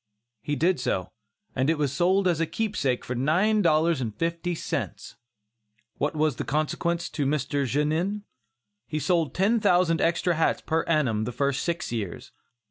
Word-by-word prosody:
He 145 - -2
did 170 +4 +2
so, 95 -7 -2 0.4
and 130 +3 +1
it 165 - +2
was 145 -3 0
sold 185 +5 +2
as 170 -3 +1
a 165 - +1
keepsake 165 - -1
for 125 - -3
nine 180 - +2
dollars 160 -3 +3
and 110 -4 -3
fifty 170 +4 -2
cents! - - -4 0.8
What 145 +3 0
was 155 -4 +1
the - - -2
consequence 170 +4 -1
to 145 - -2
Mr. 140 -1 0
Genin? 160 - 0 0.6
He 155 - -3
sold 165 -3 0
ten 210 +5 +3
thousand 175 -4 +3
extra 170 +1 +2
hats 160 0 +1
per 160 0 0
annum, 125 -10 +1
the 125 - -3
first 140 +2 0
six 170 -6 -2
years. 105 -7 -5
155 Hz, 165 wpm, -26 LUFS, 140-175 Hz, 0.8 s, dollars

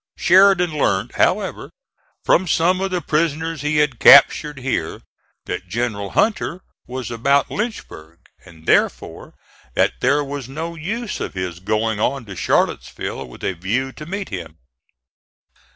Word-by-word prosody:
Sheridan 180 -2 +4
learned, 100 -6 0
however, - - 0 0.6
from 185 - +3
some 180 +3 +2
of 195 - -1
the 180 -1 -2
prisoners 160 0 -1
he 150 +1 0
had 150 -5 +1
captured 150 -2 +6
here, 130 0 -3 0.4
that 90 - -5
General 100 -1 -3
Hunter 190 - 0 0.3
was 125 -1 -6
about 140 +5 +1
Lynchburg, 140 - -6 0.3
and 80 -1 -17
therefore - - 0 0.4
that - - +2
there 145 +3 +2
was 140 -3 -6
no 160 +5 -5
use 210 +7 -4
of - - -5
his 90 -2 -4
going 110 +2 -1
on 130 +3 -1
to 100 -2 -9
Charlottesville - - -1
with 60 - -14
a 95 - -1
view 110 +10 -2
to 150 - -10
meet 195 +2 -5
him. 85 -5 -7
140 Hz, 140 wpm, -20 LUFS, 105-170 Hz, 0.6 s, captured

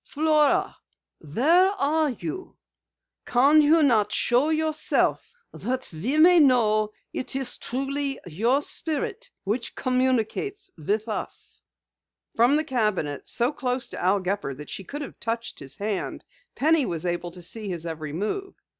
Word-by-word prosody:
"Flora, 305 0 +2 0.4
where 305 - +3
are 310 -2 +1
you? 330 +8 -6 0.7
Can 280 +5 +5
you 310 +2 +5
not 225 -7 +3
show 250 +5 +2
yourself 315 +7 0 0.2
that 255 +1 -3
we 225 - -2
may 345 +2 +7
know 215 -7 +4 0.2
it 255 - -4
is 270 -2 -3
truly 275 +2 -2
your 230 - +1
spirit 445 +13 -2
which 225 +5 -2
communicates 260 - -1
with 210 +8 -2
us?" 215 - -5 0.7
From 240 +5 +4
the 310 - +2
cabinet, 210 - -1
so 240 +3 +2
close 255 -3 -2
to - - -6
Al 190 +3 +3
Gepper 185 -7 -2
that 150 +2 -10
she 195 - -6
could 290 +9 -6
have - - -10
touched 230 0 -4
his 135 -1 -7
hand, 205 -2 -4 0.3
Penny 315 +1 +3
was 165 0 -3
able 175 0 -2
to 175 0 -11
see 210 +4 -6
his 170 -2 -4
every 155 -2 -5
move. 215 - -3
250 Hz, 145 wpm, -25 LUFS, 205-300 Hz, 0.7 s, may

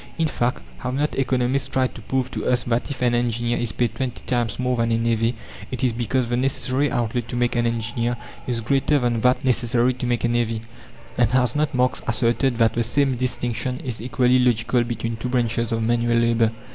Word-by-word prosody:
In 165 - +2
fact 125 -4 -1 0.2
have 125 +1 -3
not 150 +2 0
economists 130 0 0
tried 130 -1 0
to - - -10
prove 130 +2 -2
to - - -3
us 125 -1 +2
that 120 +2 -1
if 135 -3 -4
an 120 -1 +3
engineer 120 0 0
is 120 - -1
paid 120 -1 0
twenty 130 -3 -4
times 120 -4 -1
more 125 0 0
than 115 0 +1
a 115 - +3
navvy 115 0 +1 0.3
it 130 - -4
is 125 -2 +2
because 120 +2 0
the 120 - 0
"necessary" 135 +2 0
outlay 120 -1 -1
to 120 - -7
make 120 0 +1
an 120 -1 +2
engineer 115 +1 -1 0.3
is 120 -2 0
greater 140 +5 +2
than 120 -4 0
that 125 +2 +2
necessary 120 0 +2
to 125 0 -4
make 120 -1 0
a - - +3
navvy? 115 -2 0 0.6
And 120 - +4
has 125 -1 +2
not 150 -1 0
Marx 125 0 +1
asserted 120 +2 +1
that 115 -1 +3
the 120 - 0
same 135 +4 +2
distinction 125 0 -2
is 120 -4 -4
equally 125 +1 +2
logical 120 0 +2
between 115 -1 -3
two 125 +3 -4
branches 120 -1 0
of 115 -1 0
manual 120 0 +2
labour? 115 -1 +3
120 Hz, 210 wpm, -23 LUFS, 115-125 Hz, 0.6 s, And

